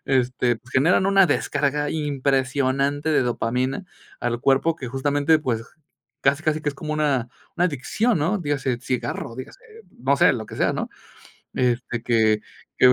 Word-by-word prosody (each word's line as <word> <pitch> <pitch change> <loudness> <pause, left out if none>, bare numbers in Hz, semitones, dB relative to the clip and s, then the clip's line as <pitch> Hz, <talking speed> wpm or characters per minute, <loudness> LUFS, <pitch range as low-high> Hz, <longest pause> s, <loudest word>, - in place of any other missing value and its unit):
Este, 125 -2 +1
pues 125 +2 -20
generan 165 +8 +3
una 195 -1 +5
descarga 145 -2 0
impresionante 140 0 0
de 150 - +3
dopamina 125 +6 -1 0.4
al 120 0 -1
cuerpo 135 +5 +3
que 130 -6 -6
justamente, 145 +4 +2
pues, 120 -7 -2 0.6
casi 140 +3 +2
casi 155 0 0
que 150 - 0
es - - -13
como 155 +2 -5
una 140 -6 +1 0.3
una 175 - +2
adicción, 180 - 0
¿no? 180 +8 +1
Dígase 140 -6 -1
cigarro, 125 -1 -3
dígase, 130 - -9 0.4
no 135 +3 +2
sé, - - +5
lo 110 -2 -4
que - - -9
sea, - - +2
¿no? - - -3 0.7
Este 120 -1 -1
que 110 -3 +2 0.4
que 125 0 +7
135 Hz, 160 wpm, -23 LUFS, 125-150 Hz, 0.7 s, que